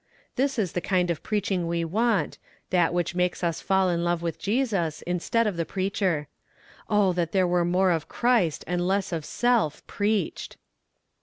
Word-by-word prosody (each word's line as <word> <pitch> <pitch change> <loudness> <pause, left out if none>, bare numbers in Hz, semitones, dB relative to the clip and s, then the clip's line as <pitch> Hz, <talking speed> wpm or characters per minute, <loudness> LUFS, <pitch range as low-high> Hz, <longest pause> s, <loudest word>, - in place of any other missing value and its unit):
This 275 0 0
is 200 -6 0
the 175 - -2
kind 180 -2 +1
of 165 - -4
preaching 195 -4 -1
we 170 0 -1
want 220 +5 0 0.3
that 175 -3 +3
which 175 0 -1
makes 180 +1 -1
us 170 -2 -1
fall 190 -1 +2
in 170 -1 0
love 175 -1 0
with 165 -1 -3
Jesus, 200 - -1
instead 180 +6 0
of 205 -5 -1
the 165 - +1
preacher. 185 -3 -1 0.6
Oh, 205 -3 +3
that 170 -2 -2
there 190 -2 +3
were 175 0 +2
more 180 +2 +2
of 160 -3 -1
Christ, 235 -11 +1
and 175 +1 -1
less 195 0 0
of 165 -3 -2
self, 235 -7 0
preached. 205 -4 -2
180 Hz, 175 wpm, -26 LUFS, 170-205 Hz, 0.6 s, that